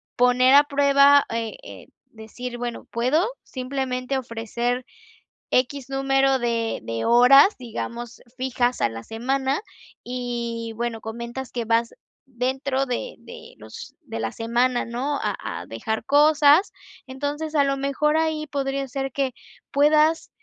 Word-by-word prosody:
poner 250 +1 +4
a 285 - +8
prueba, 280 0 +5
eh 230 -1 -3
eh, - - -11 0.2
decir, 240 +2 -8
bueno, 240 -1 -5
puedo 255 +9 +2 0.2
simplemente 255 0 -3
ofrecer 240 +1 -3 0.7
equis 260 +1 0
número 270 0 +2
de 230 -2 -1
de 115 0 -3
horas, 255 - +7
digamos, 235 -1 -7 0.2
fijas 250 -1 -1
a - - +3
la 115 0 -8
semana, 265 - -1 0.4
y 235 -2 -4
bueno, 235 0 -3
comentas 235 +3 -6
que 240 - -3
vas 230 +1 +1 0.3
dentro 265 +2 -2
de 375 - -4
de 475 0 -12
los - - -11
de - - -7
la - - -2
semana, 240 +2 0
¿no? 255 +5 -2
A 210 -2 -1 0.3
a - - -10
dejar 215 - -4
cosas. 295 +5 +5 0.3
Entonces, 290 +4 -4
a 285 - +5
lo 275 0 0
mejor 280 +3 +1
ahí 315 -1 0
podría 275 -1 -2
ser 270 +1 -3
que 270 -3 -1 0.4
puedas 305 +2 +3
255 Hz, 135 wpm, -23 LUFS, 235-280 Hz, 0.7 s, a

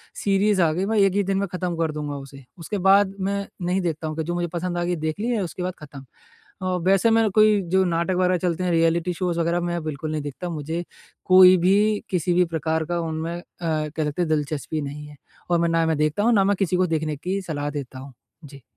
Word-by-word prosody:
Series 200 0 +2
आ 165 -2 +3
गई, 185 +4 -1
मैं 220 +2 0
एक 195 -2 +4
ही 205 - +2
दिन 195 0 -1
में 200 0 -1
ख़त्म 180 -1 -3
कर 165 -1 0
दूँगा 150 -1 -4
उसे। 140 0 -10 0.2
उसके 170 +5 -4
बाद 195 0 +5
मैं 200 +1 -2 0.2
नहीं 180 +2 0
देखता 160 -3 -3
हूँ 155 - -4
कि 160 - -1
जो 175 +2 -3
मुझे 175 0 -1
पसंद 175 0 -3
आ 175 - 0
गई 175 +1 -1
देख 155 +2 -3
ली 225 - -2
है 235 -4 0
उसके 180 +1 -5
बाद 180 0 -2
ख़त्म। 140 -3 -11 0.6
अ, - - -4 0.2
वैसे 195 +4 +4
मैं 225 -1 +3
कोई 215 0 +4
जो 190 0 +4
नाटक 170 +1 0
वगैरह 180 0 +2
चलते 175 0 -1
हैं 180 - 0
रियलिटी 165 +1 +2
शोज़ 175 -1 -2
वगैरह 170 +1 +1
मैं 175 -1 -2
बिल्कुल 155 0 -4
नहीं 155 -1 -2
देखता। 145 +5 -6
मुझे 160 +1 -4 0.4
कोई 185 0 +8
भी, 205 +4 +2
किसी 180 -2 0
भी 180 +1 +4
प्रकार 160 0 -1
का 175 +2 -2
उनमें 165 +1 -3
अ, - - -8 0.2
कह 155 -1 -1
सकते 150 +4 -2
हैं 170 - 0
दिलचस्पी 155 0 -2
नहीं 145 +1 -7
है 150 - -13 0.3
और 175 -1 +3
मैं 170 0 +1
ना 165 0 +2
मैं 160 -1 0
देखता 155 +6 0
हूँ, 235 +2 +4
ना 200 -3 +4
मैं 200 +1 +2
किसी 190 -2 +1
को 180 0 +2
देखने 155 -2 -1
की 185 +6 -3
सलाह 145 -5 -4
देता 135 -3 -6
हूँ। 135 0 -11 0.3
जी। 140 -1 -13
170 Hz, 245 wpm, -23 LUFS, 155-185 Hz, 0.6 s, कोई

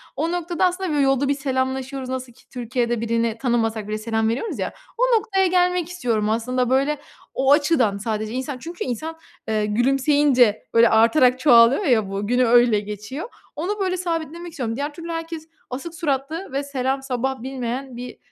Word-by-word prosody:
O 330 +1 -1
noktada, 350 +1 0
aslında, 365 +1 -1
böyle, 295 -1 +2
yolda 270 0 +2
bir 280 - +3
selamlaşıyoruz, 265 -1 -2
nasıl 260 -2 -5
ki - - -24
Türkiye'de 240 -1 -2
birini 230 0 0
tanımasak 225 -4 0
bile, 215 0 -2
selam 220 0 0
veriyoruz 255 - -3
ya. - - -2 0.2
O - - +4
noktaya 385 -3 +1
gelmek 360 -1 +2
istiyorum 230 -12 -1
aslında, 245 +3 0
böyle, 280 +3 +1 0.3
o 265 +1 +2
açıdan, 285 -9 +3
sadece 215 +1 -3
insan, 260 +1 -3
çünkü 335 +6 -6
insan, 310 +7 -4 0.3
eee, 215 -1 0
gülümseyince, 255 0 +3
böyle, 230 0 +6
artarak 245 +3 +4
çoğalıyor 250 - +6
ya 220 -6 +2
bu, 200 +1 -3
günü 245 +2 +3
öyle 235 -2 +5
geçiyor. 210 - -6 0.3
Onu, 390 +7 -3
böyle, 370 -1 0
sabitlemek 340 -1 -4
istiyorum. 245 -8 -3
Diğer 290 +3 -3
türlü 335 +2 -8
herkes, 330 -1 -5 0.2
asık 300 +7 -6
suratlı 300 +3 -2
ve 275 +1 -1
selam 270 -1 -2
sabah 265 -1 -2
bilmeyen 260 0 -4
bir, 250 0 -8
260 Hz, 170 wpm, -22 LUFS, 235-315 Hz, 0.3 s, böyle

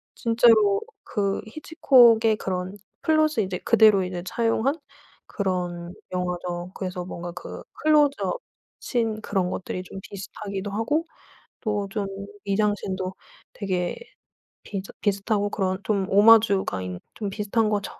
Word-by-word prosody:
진짜로 225 -4 +4 0.2
그 200 -1 -1
히치콕의 240 -6 +4
그런 185 +1 -3 0.3
플롯을 310 -6 +3
이제 185 -1 -4
그대로 215 -4 +5
이제 180 -1 -4
차용한 230 +6 +1 0.5
그런 180 -3 -3 0.2
영화죠. 180 -1 -3
그래서 185 -2 -5
뭔가 175 -1 -6
그 180 - -8
클로즈업 300 - +2 0.4
신 225 -3 -1
그런 190 -4 -1
것들이 185 0 -4
좀 190 +1 -9
비슷하기도 200 0 -6
하고 260 +11 0 0.6
또 210 -3 -1
좀 205 -1 -2 0.4
미장센도 195 -2 -1 0.4
되게 185 -3 -2 0.7
비슷 195 -1 -6
비슷하고 205 0 0
그런 190 -2 0
좀 200 -3 0
오마주가 205 - +5
인 90 -1 -5
좀 205 -3 -4
비슷한 210 +2 0
거죠. 205 -2 0
200 Hz, 265 characters per minute, -25 LUFS, 185-225 Hz, 0.7 s, 그대로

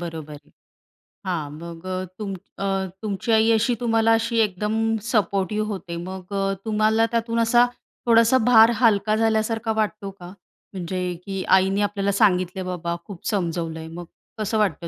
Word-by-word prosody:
बरोबर 160 -3 -6
आहे. 145 - -13 0.8
हां. 170 -6 -2
मग 170 +2 -9
अ, 185 0 -2 0.2
तुम 200 -2 -4 0.2
अ, 195 - -3 0.4
तुमची 215 +2 -2
आई 220 +1 +4
अशी 230 +2 +2
तुम्हाला 225 -1 +2
अशी 230 +1 0
एकदम 220 +2 0 0.2
सपोर्टिव्ह 210 -1 0
होते. 175 -3 -6
मग 185 +2 -7
अ, 195 0 0
तुम्हाला 220 +1 +2
त्यातून 230 0 0
असा 240 +1 +5 0.4
थोडासा 230 +2 +5
भार 230 -1 +7
हलका 215 -2 +3
झाल्यासारखा 225 0 0
वाटतो 210 -1 -3
का? 175 - -9 0.5
म्हणजे 180 0 -3
की 195 -1 -3
आईने 195 +2 +1
आपल्याला 200 -1 0
सांगितलंय 185 -2 +2
बाबा 170 -1 -3
खूप 195 -4 -11
समजवलंय. 165 -5 -2
मग 175 +2 -8 0.3
कसं 215 +1 -1
वाटतं 195 -5 0
205 Hz, 150 wpm, -23 LUFS, 180-225 Hz, 0.8 s, भार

